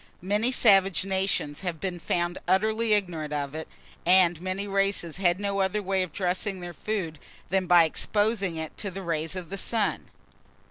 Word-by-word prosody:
Many 210 +6 +2
savage 195 -6 +4
nations 190 -6 -1
have 175 -4 -4
been 180 -1 -4
found 175 +1 -1
utterly 215 +4 +2
ignorant 170 -7 -1
of 140 -1 -3
it, 160 0 -6 0.4
and 175 -2 +4
many 185 +2 -3
races 195 -4 0
had 180 -1 +2
no 200 -1 -2
other 195 +2 0
way 190 0 0
of 185 -3 -3
dressing 185 +3 -2
their 175 -1 -7
food 170 -5 -4 0.3
than 190 -1 +1
by 175 -1 +7
exposing 205 +2 0
it 160 -1 -6
to 200 - -2
the 195 +1 -7
rays 165 0 -1
of 185 -1 -7
the 195 - -2
sun. 220 0 -1
185 Hz, 175 wpm, -26 LUFS, 175-200 Hz, 0.4 s, by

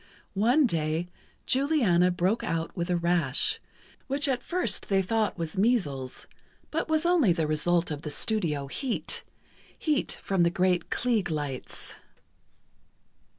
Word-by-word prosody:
One 245 +9 +3
day, 165 -3 -1 0.4
Juliana 255 - +3
broke 180 +5 0
out 165 0 -2
with 170 -1 -3
a 180 - +2
rash, 170 -5 +2 0.5
which 280 +2 +1
at 260 -2 0
first 360 +7 -1
they 195 -1 +3
thought 220 +2 0
was 165 +3 -4
measles, 150 - 0 0.5
but 315 0 -2
was 315 +1 +2
only 340 - +4
the 165 -2 0
result 165 +3 +1
of 145 -1 -4
the 150 - -5
studio 150 -4 +1
heat, 245 - -2 0.5
heat 300 -3 0
from 195 -2 +1
the 170 - +4
great 180 -1 +1
Klieg 235 -7 0
lights. 145 -4 -5
180 Hz, 135 wpm, -27 LUFS, 160-245 Hz, 0.5 s, only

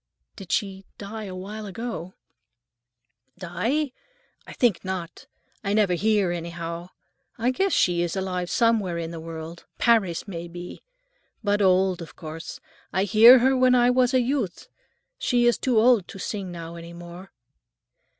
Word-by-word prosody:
"Did 195 -4 -10
she 195 -1 -1
die 215 +2 -7
a 185 -2 -7
long 185 - -6
while 210 +2 -7
ago?" 195 -3 -6 1.2
"Die? 225 - -1 0.6
I - - -9
think 235 -8 +1
not. 185 -3 -6 0.4
I 200 0 -1
never 205 -4 +3
hear, 205 0 +2
anyhow. 170 0 -5 0.5
I 240 +2 +1
guess 385 +9 0
she 175 - +2
is 175 +1 -2
alive 180 -2 -2
somewhere 220 -7 +2
in 165 -1 -4
the 165 - -7
world; 165 +1 -8
Paris, 215 -7 +2
may 170 -3 -6
be. 175 +1 -9 0.6
But 205 0 +1
old, 185 -1 +3
of 165 - -10
course. 160 0 -8 0.3
I 190 - +1
hear 220 +6 +8
her 265 0 +4
when 255 -1 +4
I 245 0 +4
was 250 0 +3
a 255 - +5
youth. 245 -7 -2 0.5
She 245 -2 +2
is 240 - +3
too 250 -3 +1
old 225 -4 +4
to - - -10
sing 195 -1 -4
now 170 -1 -8
any 170 0 -10
more." 175 +2 -10
190 Hz, 160 wpm, -25 LUFS, 175-230 Hz, 1.2 s, hear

